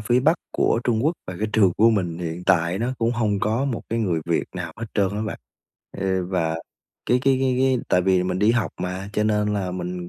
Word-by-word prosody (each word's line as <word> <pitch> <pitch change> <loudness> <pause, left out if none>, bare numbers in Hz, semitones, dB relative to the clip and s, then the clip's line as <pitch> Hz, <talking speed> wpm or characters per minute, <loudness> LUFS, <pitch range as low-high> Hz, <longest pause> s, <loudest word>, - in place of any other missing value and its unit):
phía 120 +4 +2
Bắc 155 +6 +4 0.2
của 115 - +2
Trung 115 +1 +1
Quốc 160 - +3
và 90 -1 -6
cái 110 - 0
trường 100 -5 +4
của 115 +2 +6
mình 90 -6 -1
hiện 85 0 -4
tại 90 0 +3
nó 120 +3 -1
cũng 115 0 +1
hông 105 -4 0
có 115 +5 +1
một 130 -5 -2
cái 115 - -1
người 90 -7 0
Việt 85 - +1
nào - - -5
hết 115 +1 -5
trơn 100 -2 +2
á 105 +2 -3
bạn. 110 - -4 0.6
Ê, 95 -1 0
và 90 -3 -1 0.5
cái 125 - +3
cái 135 -1 +4
cái 130 -1 +1
cái 130 -1 +3
tại 90 - +3
vì 95 -1 +3
mình 90 0 -1
đi 105 +3 +4
học 120 -1 +1
mà 90 +2 -4
cho 105 - +1
nên 105 -1 +1
là 95 -3 -2
mình 90 -1 -5
105 Hz, 245 wpm, -23 LUFS, 90-115 Hz, 0.6 s, của